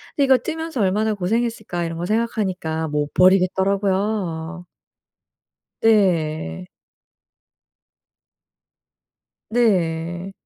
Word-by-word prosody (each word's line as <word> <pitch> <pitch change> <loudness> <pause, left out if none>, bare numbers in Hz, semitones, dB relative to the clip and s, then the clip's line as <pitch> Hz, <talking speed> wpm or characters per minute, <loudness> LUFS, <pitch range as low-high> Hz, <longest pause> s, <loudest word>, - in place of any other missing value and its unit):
근데 285 - +2
'이거 265 -1 +5
뜨면서 320 -6 -4
얼마나 210 +3 +1
고생했을까.' 215 -2 -2
이런 165 0 -5
거 175 - -3
생각하니까 190 -7 -1
못 150 -1 -2
버리겠더라고요. 185 -2 +1 1.2
네. 160 - +1 2.8
네. 175 -5 0
190 Hz, 190 characters per minute, -21 LUFS, 165-220 Hz, 2.8 s, 이거